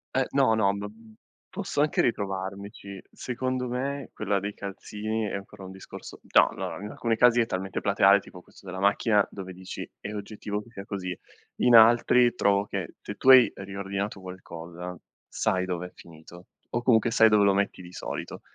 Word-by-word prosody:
Eh 130 - +3
no, 135 -5 +3
no 100 -2 +2
ma, 100 +1 -5 0.6
posso 145 - -2
anche 150 - +2
ritrovarmici. 100 -2 -4
Secondo 130 0 -3
me 135 +2 -3
quella 100 -2 -1
dei 100 +2 -4
calzini 105 +2 -4
è - - -5
ancora 100 0 -9
un 95 - -9
discorso 95 - -10
no, - - +7
no - - -5
allora, 100 - -7
in 105 - -5
alcuni 115 -1 -1
casi 120 0 +5
è - - +1
talmente 95 -2 -4
plateale 100 0 +5
tipo 90 -2 -13
questo 95 - -20
della 95 0 -6
macchina 100 +1 +3
dove 95 -2 -8
dici 95 0 -8
è 105 - -6
oggettivo 105 0 -5
che 115 - -17
sia 100 -3 -9
così. 90 -3 -5 0.4
In 125 - +5
altri 120 +2 +6
trovo 100 -2 +2
che - - -5
se - - -7
tu 130 - +1
hai 130 -2 +9
riordinato 100 +1 -5
qualcosa 90 -1 -8 0.3
sai 95 0 0
dov'è 90 0 -4
finito 85 +2 -14 0.2
o 120 - -2
comunque 115 -1 +3
sai 110 -1 +6
dove 105 -1 +4
lo 100 - +4
metti 100 -1 -1
di 90 - -11
solito. - - -6
100 Hz, 180 wpm, -27 LUFS, 95-115 Hz, 0.6 s, hai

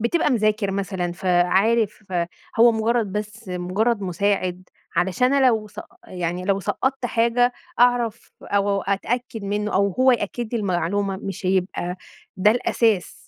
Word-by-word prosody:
بتبقى 295 +7 +1
مذاكر 215 -4 +1
مثلًا 190 -2 -2
فعارف 190 +5 +2
فهو 185 +6 +1
مجرّد 225 -2 0
بس 210 -1 -5
مجرّد 195 +5 -1
مساعد، 185 -1 -1 0.3
علشان 190 +8 +2
أنا 275 -2 +4
لو 220 -4 +2
سق 210 - -10 0.2
يعني 180 0 -3
لو 195 +1 +1
سقّطت 265 +6 -1
حاجة 235 +1 +2 0.3
أعرف 240 -2 +2
أو 200 -1 0
أتأكد 225 +3 -2
منُّه 210 +1 -2
أو 200 +1 +3
هو 260 +5 +4
يأكد 235 +1 -3
لي 230 - 0
المعلومة 195 +1 -1
مش 190 -1 -6
هيبقى 180 -1 -1 0.4
ده 200 +3 +4
الأساس. 225 -5 +1
205 Hz, 135 wpm, -22 LUFS, 185-230 Hz, 0.4 s, أنا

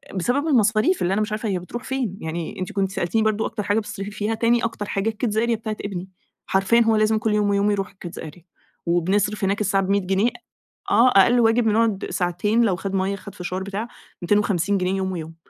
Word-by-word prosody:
بسبب 250 - 0
المصاريف 225 - +3
اللي 180 +2 +1
أنا 215 - +1
مش 210 - -2
عارفة 215 0 -2
هي 185 -2 -1
بتروح 240 +8 -7
فين؟! 250 -8 -3
يعني 160 +2 -5
أنتِ 185 - -4
كنتِ 195 -1 -1
سألتيني 195 +4 0
برضه 215 0 +1
أكتر 210 -2 -4
حاجة 205 +2 +1
بتصرفي 205 -1 -6
فيها 210 +2 -2
تاني 235 +1 +2
أكتر 225 -2 -3
حاجة 200 +2 -1
الkids 220 -1 -2
area 235 +1 +2
بتاعة 220 -1 -5
ابني، 190 -1 -5 0.4
حرفيًا 195 +5 +3
هو 225 -1 +3
لازم 215 0 +3
كل 215 0 0
يوم 210 -1 +2
ويوم 200 +1 +2
يروح 195 -2 -1
الkids 175 -3 -9
area 160 +2 -10 0.4
وبنصرف 195 +5 +1
هناك 200 +2 0
الساعة 195 -1 +1
ب100 200 0 +1
جنيه 195 +5 +2 0.6
آه 235 +5 +6
أقل 235 +4 +5
واجب 225 0 +3
نقعد 220 -2 +1
ساعتين 190 +6 +1
لو 195 -5 +2
خد 195 +1 -5
مَيّة، 190 +1 0
خد 200 0 -11
فشار 185 +1 -4
بتاع 200 +4 -4 0.3
250 200 0 +1
جنيه 185 0 0
يوم 190 -1 -1
ويوم 165 -2 -6
205 Hz, 210 wpm, -22 LUFS, 190-220 Hz, 0.6 s, آه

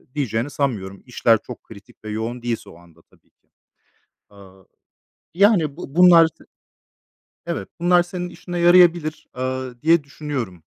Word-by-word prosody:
diyeceğini 125 -3 -2
sanmıyorum. 105 -10 -4
İşler 115 -3 +2
çok 125 - -10
kritik 100 -2 -16
ve - - -6
yoğun 115 +3 -4
değilse 120 -1 -4
o - - -15
anda 85 -1 -21
tabii - - -31
ki. - - -50 0.8
Aaa, 95 -2 -18 0.7
yani 175 -7 +3
bu 155 -5 -10
bunlar, 170 -2 +7
t 160 - -22 1.0
evet, 95 - -4
bunlar 175 0 +4
senin 180 0 -6
işine 175 0 -7
yarayabilir, 175 -2 +4
ııı, 130 -1 -4
diye 165 -1 +3
düşünüyorum. 135 - -6
135 Hz, 140 wpm, -21 LUFS, 110-170 Hz, 1.0 s, bunlar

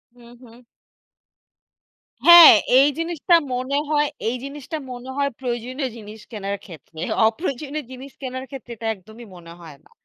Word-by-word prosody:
হুম, 240 -1 -17
হুম। 240 0 -17 1.7
হ্যাঁ, 345 -1 +11 0.3
এই 280 - +5
জিনিসটা 340 +1 +1 0.2
মনে 255 +3 -2
হয় 295 -1 +2 0.2
এই 250 - -3
জিনিসটা 285 +2 -7
মনে 250 +1 -9
হয় 280 0 0
প্রয়োজনীয় 255 +2 -4
জিনিস, 215 0 -11
কেনার 200 -2 -4
ক্ষেত্রে 160 -2 -14 0.3
অপ্রয়োজনীয় 285 +3 -4
জিনিস 260 +2 -10
কেনার 260 0 -6
ক্ষেত্রে 260 -4 -10
এটা 225 0 -6
একদমই 220 +4 -14
মনে 170 -1 -13
হয় 160 -4 -13
না। - - -25
250 Hz, 145 wpm, -21 LUFS, 220-280 Hz, 1.7 s, হ্যাঁ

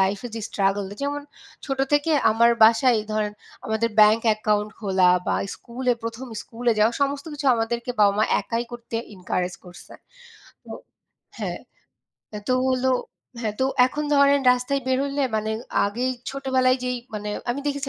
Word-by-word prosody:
লাইফে 195 +5 0
যে 225 - -4
struggle; 195 0 0
যেমন, 290 +1 -2 0.4
ছোট 270 -1 -3
থেকে 290 +2 +2 0.2
আমার 235 +2 +4
বাসায় 235 +2 +5
এই 210 - -8
ধরেন 210 -1 -1 0.3
আমাদের 220 +1 0
bank 215 +2 +6
account 210 -1 0
খোলা 190 -4 +3 0.2
বা - - +1 0.2
স্কুলে 250 +1 -2
১ম 230 +3 -5 0.2
স্কুলে 235 +1 -1
যাওয়া, 220 +3 +4
সমস্ত 280 +1 -1
কিছু 290 -1 -5
আমাদেরকে 235 +2 -2
বাবা-মা 205 +1 +4 0.2
একাই 230 0 -3
করতে 235 -1 -6 0.2
encourage 180 -1 -3
করসে। 175 -1 -13 0.7
তো - - -15 0.7
হ্যাঁ, - - -4 0.7
এ্যা 210 - -6
তো 255 - +3
হলো 260 0 +1 0.5
হ্যাঁ, 215 -1 -2
তো - - +3 0.2
এখন 295 +3 -4
ধরেন 280 0 +5
রাস্তায় 250 +3 -1
বের 260 0 +1
হইলে 280 0 -2
মানে 215 0 -2 0.4
আগেই 245 +6 -1 0.2
ছোটবেলায় 260 -1 +1
যেই 250 0 -1 0.2
মানে 210 0 -4 0.2
আমি 270 +4 -2
দেখেছি 280 -1 -2
235 Hz, 155 wpm, -23 LUFS, 210-260 Hz, 0.7 s, bank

